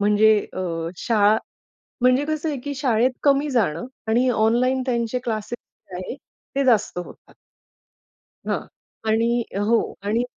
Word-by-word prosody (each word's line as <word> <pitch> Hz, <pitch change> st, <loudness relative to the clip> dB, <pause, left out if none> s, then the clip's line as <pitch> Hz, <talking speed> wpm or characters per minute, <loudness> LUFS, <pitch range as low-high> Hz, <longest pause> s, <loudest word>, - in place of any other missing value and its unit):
म्हणजे 210 Hz, +1 st, +5 dB, 0.2 s
अ, 185 Hz, -, -3 dB, 0.4 s
शाळा 210 Hz, 0 st, +3 dB, 0.7 s
म्हणजे 255 Hz, +3 st, +4 dB
कसं 310 Hz, +1 st, -2 dB
आहे, 285 Hz, -, -2 dB
की 285 Hz, +2 st, -5 dB
शाळेत 255 Hz, -2 st, +2 dB
कमी 285 Hz, +1 st, +3 dB
जाणं 195 Hz, -7 st, +1 dB, 0.2 s
आणि 245 Hz, +3 st, +3 dB
ऑनलाईन 245 Hz, +3 st, +2 dB
त्यांचे 235 Hz, 0 st, 0 dB
क्लासेस 225 Hz, +1 st, -3 dB, 0.3 s
जे -, -, -6 dB
आहेत 270 Hz, -, -6 dB, 0.4 s
ते 275 Hz, -, +2 dB
जास्त 220 Hz, -7 st, +2 dB
होतात. 175 Hz, -, -11 dB, 1.2 s
हां. -, -, 0 dB, 0.5 s
आणि 225 Hz, +1 st, +3 dB, 0.4 s
हो. 230 Hz, 0 st, +4 dB, 0.2 s
आणि 220 Hz, +4 st, 0 dB
235 Hz, 135 wpm, -23 LUFS, 220-260 Hz, 1.2 s, म्हणजे